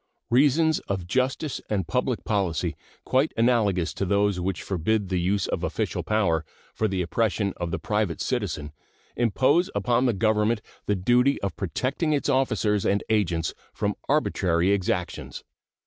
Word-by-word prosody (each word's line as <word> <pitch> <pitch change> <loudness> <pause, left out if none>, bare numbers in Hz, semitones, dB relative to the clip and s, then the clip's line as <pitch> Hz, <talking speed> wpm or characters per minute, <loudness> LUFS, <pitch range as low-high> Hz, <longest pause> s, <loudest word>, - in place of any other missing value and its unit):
Reasons 150 +5 +4
of 95 -3 -2
justice 130 - -1
and 95 -5 -1
public 125 -1 -1
policy 95 -8 -1 0.3
quite 135 +4 +1
analogous 105 -7 +2
to - - -3
those 100 0 +1
which 90 -1 -2
forbid 100 +2 0
the 90 -2 0
use 95 +2 +1
of - - -3
official - - -2
power 90 -7 +1 0.3
for 110 - 0
the 95 -2 -1
oppression 100 +2 0
of 85 -1 -3
the - - -2
private 105 -5 -1
citizen 90 - -2 0.4
impose 135 - +2
upon 125 +1 +2
the 120 - +2
Government 110 +2 +2 0.3
the 105 - +2
duty 125 +8 +3
of 100 - -2
protecting 130 - -1
its 145 0 0
officers 110 -6 +1
and 100 +1 +1
agents 85 -6 +1 0.2
from 105 0 -1 0.2
arbitrary 95 - +2
exactions. 90 -3 -2
105 Hz, 145 wpm, -25 LUFS, 95-125 Hz, 0.4 s, Reasons